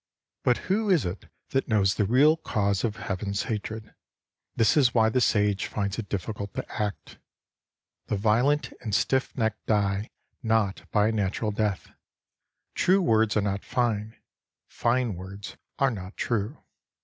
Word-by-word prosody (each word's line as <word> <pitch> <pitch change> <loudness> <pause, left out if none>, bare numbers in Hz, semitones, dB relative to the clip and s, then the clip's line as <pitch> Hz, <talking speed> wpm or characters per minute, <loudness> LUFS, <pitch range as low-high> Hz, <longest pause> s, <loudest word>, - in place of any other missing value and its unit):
But 125 - +3
who 210 +3 +1
is 175 - +3
it 90 +3 -5 0.2
that 135 - 0
knows 100 -4 +3
the 105 - +1
real 140 +9 +5
cause 100 -10 -1
of 110 -3 -1
Heaven's 100 -1 -3
hatred? 110 0 -5 0.6
This 110 -3 +3
is 135 -5 +4
why 110 -1 +5
the 125 +3 +1
Sage 105 -3 +2
finds 100 0 -2
it 100 -4 -6
difficult 100 +1 -4
to - - -3 0.2
act. 105 -2 -4 0.9
The - - 0
violent 120 +8 +2
and 105 -3 -2
stiff 130 +1 0
necked 110 -3 -1
die 100 0 +1 0.3
not 110 -4 0
by 105 0 +3
a - - +1
natural 105 0 -1
death. 105 -2 -2 0.8
True 190 +2 +3
words 110 - +2
are - - +3
not 100 0 -2
fine; 110 -3 -1 0.5
fine 120 -1 0
words 95 +3 -8 0.2
are 135 -2 +3
not 95 -3 -8
true. 115 +4 -2
110 Hz, 150 wpm, -27 LUFS, 100-120 Hz, 0.9 s, real